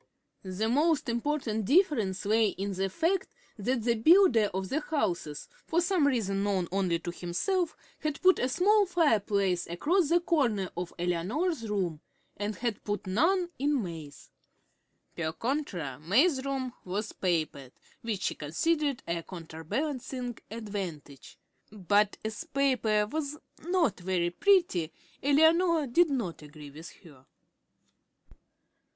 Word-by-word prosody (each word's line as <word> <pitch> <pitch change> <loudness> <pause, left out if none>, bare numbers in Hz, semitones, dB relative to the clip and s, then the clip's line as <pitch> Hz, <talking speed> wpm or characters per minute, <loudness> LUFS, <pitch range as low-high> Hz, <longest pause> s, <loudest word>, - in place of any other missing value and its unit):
The 190 +3 -2
most 290 +2 +2
important 235 -3 -1
difference 240 - +2
lay 220 +2 +3
in 195 0 -3
the 190 +1 -1
fact 335 - -1 0.2
that 240 +3 -1
the 235 0 +3
builder 235 - +5
of 190 0 -3
the 300 - 0
houses, 180 - -2 0.2
for 330 - +2
some 350 -4 +2
reason 200 -7 0
known 195 -3 0
only 185 -3 +1
to 175 +1 -5
himself, 315 - -1 0.2
had 305 -2 -3
put 370 0 +5
a 255 - +1
small 405 +8 +3
fireplace 205 - +1
across 300 - +1
the 345 - +4
corner 245 - 0
of 175 0 -4
Eleanor's 220 - -1
room, 180 -7 -1 0.3
and 205 +1 -3
had 235 +1 -3
put 205 -2 -3
none 345 - +2
in 285 -3 +1
May's. 160 -5 -9 0.8
Per 160 -2 -2
contra 180 - -3
May's 260 - +3
room 265 -2 -3
was 205 +4 -3
papered, 155 -7 -2 0.3
which 215 -5 -3
she - - 0
considered 285 - -1
a 170 0 -1
counterbalancing 245 - -4
advantage; 190 - -7 0.3
but 205 0 +1
as 220 -1 -4
the 330 - -10
paper 255 -8 +2
was 295 +5 -4 0.3
not 340 - +1
very 175 -1 0
pretty, 335 - +2 0.3
Eleanor 320 +3 +4
did 325 +7 +3
not 230 - -3
agree 150 -1 -11
with 155 +4 -10
her. 140 -6 -17
220 Hz, 135 wpm, -29 LUFS, 180-300 Hz, 0.8 s, builder